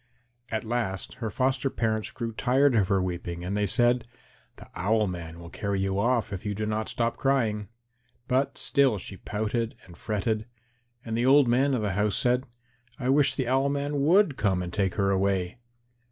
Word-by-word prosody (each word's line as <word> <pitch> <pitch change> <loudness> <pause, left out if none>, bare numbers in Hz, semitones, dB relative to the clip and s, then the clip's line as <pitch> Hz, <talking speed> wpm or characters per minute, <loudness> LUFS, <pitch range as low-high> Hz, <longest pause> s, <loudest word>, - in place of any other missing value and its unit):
At 110 -1 -2
last 110 -5 -3
her 110 - -1
foster 130 +3 0
parents 110 -3 -1
grew 115 -2 -5
tired 130 +4 +2
of 100 -4 +3
her 95 -1 +2
weeping 85 -1 -4
and 95 +3 -2
they 105 0 +1
said, 120 +3 +2 0.5
"The - - -13
Owl 105 +4 +1
man 85 -3 -6
will 85 0 -11
carry 100 -1 -2
you 95 0 0
off 115 -1 +1
if 95 - -5
you 105 -1 -2
do 110 +2 -2
not 110 +1 -2
stop 115 0 -1
crying." 115 -7 +1 0.6
But 135 +1 0
still 135 -6 +2
she 95 0 -8
pouted 110 +3 -2
and 85 - -14
fretted. 110 +3 -2 0.6
And 115 -1 -3
the 120 +2 +1
old 140 0 +6
man 130 +3 +3
of 115 - -1
the 105 - 0
house 105 +2 +1
said, 125 0 +2 0.5
"I 125 - -2
wish 140 +1 +4
the 130 -3 -1
Owl 135 +2 +2
man 145 0 -1
would 170 -1 +4
come 95 -4 +1
and 90 -1 -6
take 95 -1 0
her 100 -1 +1
away." 95 +2 0
110 Hz, 190 wpm, -27 LUFS, 100-130 Hz, 0.6 s, old